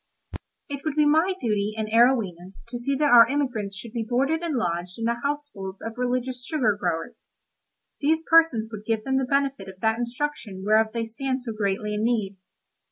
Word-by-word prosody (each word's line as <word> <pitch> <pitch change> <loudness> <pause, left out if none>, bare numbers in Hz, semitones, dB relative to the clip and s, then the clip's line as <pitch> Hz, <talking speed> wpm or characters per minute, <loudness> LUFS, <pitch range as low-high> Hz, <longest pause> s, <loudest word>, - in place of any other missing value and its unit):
It 280 -1 -5
would 310 -2 -2
be 300 -1 +4
my 320 +6 +3
duty 210 - -1
and 220 -1 -2
Arowhena's 215 -6 +1
to 240 - -4
see 275 +3 -1
that 290 +1 +2
our 235 -1 +8
emigrants 250 -8 -2
should 230 +2 -9
be 235 -2 -2
boarded 270 +8 0
and 335 -4 -2
lodged 175 -3 -2
in 225 - -3
the 235 +1 0
households 280 -10 -4
of 225 - -4
religious 250 0 -2
sugar 245 -9 +1
growers; 170 -4 -4 0.7
these 315 +2 +1
persons 320 -10 +4
would 210 -2 -7
give 225 -1 0
them 265 +2 0
the 265 - 0
benefit 275 -6 0
of 190 -1 -12
that 220 +1 +1
instruction 235 -5 -4
whereof 215 +1 +4
they 230 0 -2
stand 260 +3 -3
so 235 - -4
greatly 210 0 -1
in 210 +1 -1
need. 215 -5 0
235 Hz, 190 wpm, -25 LUFS, 210-275 Hz, 0.7 s, our